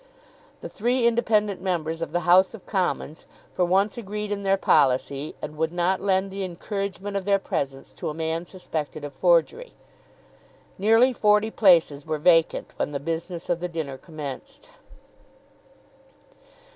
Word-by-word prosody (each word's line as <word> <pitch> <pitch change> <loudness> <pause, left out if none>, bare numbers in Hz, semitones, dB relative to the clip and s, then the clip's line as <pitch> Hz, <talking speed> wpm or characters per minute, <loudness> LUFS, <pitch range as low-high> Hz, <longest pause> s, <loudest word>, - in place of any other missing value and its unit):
The - - -6
three 240 +3 0
independent 215 -4 +1
members 165 -3 -2
of 165 - -4
the 175 - 0
House 185 +4 +4
of 205 - -14
Commons 180 -5 -2 0.3
for 180 - +1
once 195 +6 +1
agreed 210 -1 -5
in 200 -1 -2
their 195 0 +2
policy, 140 -2 +1
and 150 - -6
would 160 +1 0
not 175 +2 0
lend 195 0 +1
the 195 0 -4
encouragement 195 +2 -5
of 195 - -1
their 200 +1 +3
presence 140 -9 -4
to - - -5
a - - -4
man 160 +1 -2
suspected 155 -5 -5
of 145 -1 -6
forgery. 180 - +1 1.1
Nearly 225 +6 +4
forty 210 -1 +3
places 165 -9 +4
were 155 0 -2
vacant 165 +1 +2
when 145 - -2
the 140 - -2
business 165 +3 -4
of 175 -1 0
the 180 +1 -4
dinner 150 -6 -5
commenced. 155 - -9
180 Hz, 150 wpm, -25 LUFS, 160-200 Hz, 1.1 s, House